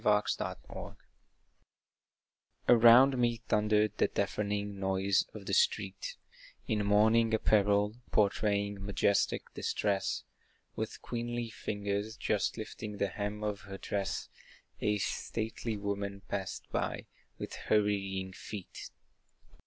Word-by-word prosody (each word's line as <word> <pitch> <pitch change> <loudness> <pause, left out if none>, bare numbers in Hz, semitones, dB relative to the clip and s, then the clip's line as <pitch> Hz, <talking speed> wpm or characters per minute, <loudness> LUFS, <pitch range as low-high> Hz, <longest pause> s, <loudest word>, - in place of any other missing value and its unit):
To - - -3
a 105 0 +5
Passer - - -2 0.2
by - - -7 1.7
Around 120 +3 +8
me 120 -1 +2
thundered 105 0 +3
the - - +5
deafening 100 0 -2
noise 95 +1 +2
of - - -8
the - - -3
street, 475 +1 +1 0.5
In 105 -3 +1
mourning 110 +2 +4
apparel, 105 0 +3
portraying 100 -1 +1
majestic 100 0 +1
distress, 100 -2 -1 0.5
With - - -4
queenly 120 -1 -3
fingers, 105 +1 -3
just 105 +1 0
lifting 110 -1 -6
the 100 0 0
hem 105 +2 -4
of 105 -1 -2
her 95 - -5
dress, 100 0 -2 0.5
A 105 0 +2
stately 110 +2 -3
woman 100 -1 -3
passed 95 -3 -4
by - - -2 0.3
with - - -6 0.2
hurrying 95 -3 +1
feet. 100 0 -8
105 Hz, 115 wpm, -32 LUFS, 100-110 Hz, 1.7 s, Around